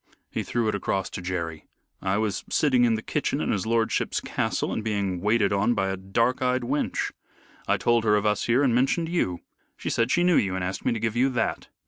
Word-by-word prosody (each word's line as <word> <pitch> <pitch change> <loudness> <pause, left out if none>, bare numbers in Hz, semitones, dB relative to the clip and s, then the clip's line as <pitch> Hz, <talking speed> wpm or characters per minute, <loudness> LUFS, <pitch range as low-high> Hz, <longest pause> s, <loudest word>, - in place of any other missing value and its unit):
He - - -2
threw 120 -2 -1
it 105 - +1
across 100 -1 -2
to - - -5
Jerry. 85 -3 -4 0.3
"I 95 +1 0
was 105 -3 -1
sitting 130 -5 +3
in 115 -1 +3
the 110 - -5
kitchen 145 -1 -1
in - - 0
his 100 -1 -1
lordship's 115 -1 +1
castle - - -2
and 110 - -3
being 100 -4 -1
waited 105 -1 +2
on 105 +5 +2
by 95 0 0
a 95 - -1
dark 115 +7 0
eyed 125 0 +1
wench. 140 +5 -1 0.6
I - - +3
told 120 -1 +2
her 105 -1 +4
of 105 0 0
us 105 -1 +1
here 120 +4 +3
and 130 -4 +3
mentioned 135 +7 +1
you. 90 - -1 0.4
She - - -3
said 115 +1 +1
she 175 +5 +3
knew 180 -1 +4
you 95 -2 +1
and 95 - -2
asked 90 +1 -4
me - - +3
to 115 - -3
give 110 0 -1
you 130 +3 +3
that. 120 - -1
110 Hz, 230 wpm, -26 LUFS, 95-125 Hz, 0.6 s, her